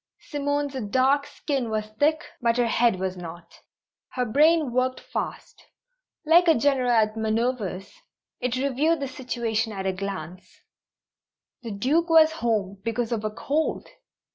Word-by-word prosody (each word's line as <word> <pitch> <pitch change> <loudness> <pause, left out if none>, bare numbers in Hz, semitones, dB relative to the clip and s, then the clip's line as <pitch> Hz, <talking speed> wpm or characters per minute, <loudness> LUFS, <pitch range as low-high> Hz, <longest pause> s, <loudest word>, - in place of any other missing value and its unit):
Simone's 285 -1 -2 0.2
dark 270 +5 +2
skin 270 -6 -3
was 215 -1 -1
thick, 305 +1 +2 0.2
but 235 0 +2
her 245 - +3
head 230 -3 +2
was 190 0 -2
not. 170 -1 -10 0.5
Her 250 -1 0
brain 300 +4 +3
worked 255 +1 0
fast. - - -6 0.6
Like 340 +3 +5
a 325 - +6
general 260 0 +2
at 220 -2 +3
manoeuvres, 220 -3 -2 0.5
it 250 -1 -1
reviewed 280 +5 +1
the 275 - -3
situation 235 -4 -2
at 195 -2 -5
a 190 - 0
glance. 185 -2 -7 1.0
The 235 - -7
Duke 275 +12 0
was 320 -1 +6
at 320 - -9
home 200 -7 -1
because 230 +1 -2
of 225 -2 -1
a 215 - 0
"_cold! 290 +8 -2
245 Hz, 145 wpm, -25 LUFS, 215-285 Hz, 1.0 s, a